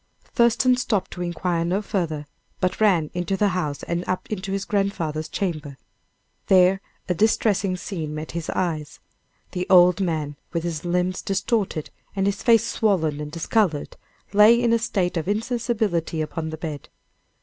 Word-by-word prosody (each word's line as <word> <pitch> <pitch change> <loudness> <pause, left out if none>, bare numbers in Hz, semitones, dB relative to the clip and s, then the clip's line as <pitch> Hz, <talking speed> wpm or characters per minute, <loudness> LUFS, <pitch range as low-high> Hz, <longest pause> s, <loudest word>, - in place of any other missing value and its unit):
Thurston 240 +1 +3
stopped 215 -6 -1
to 180 - -7
inquire 175 -1 -1
no 180 +4 0
farther, 165 -8 -2 0.3
but 185 +2 -1
ran 175 -8 +3
into 180 +2 -1
the 205 +1 +3
house 155 -7 -2
and 170 +1 -2
up 185 - -1
into 195 -2 -3
his 195 0 -2
grandfather's 170 -7 -1
chamber. 155 -8 -3 0.7
There 190 0 +5 0.3
a 180 - +1
distressing 200 -1 +2
scene 160 -6 -5
met 155 0 -5
his 170 -1 -5
eyes. 160 -5 -2 0.5
The 180 +1 -3
old 180 0 +6
man, 155 -5 -2 0.2
with 170 -1 -1
his 165 -3 -3
limbs 180 +1 0
distorted, 195 -4 -1 0.2
and 195 -1 +1
his 200 0 -1
face 230 -2 +5
swollen 165 -11 +1
and 150 0 -6
discolored, 165 -1 0 0.4
lay 215 +3 +7
in 235 -1 +2
a 230 - +3
state 185 -5 -1
of 165 - -2
insensibility 215 -6 -1
upon 160 +1 -3
the 160 - -6
bed. 155 -3 -6
180 Hz, 160 wpm, -24 LUFS, 160-205 Hz, 0.7 s, lay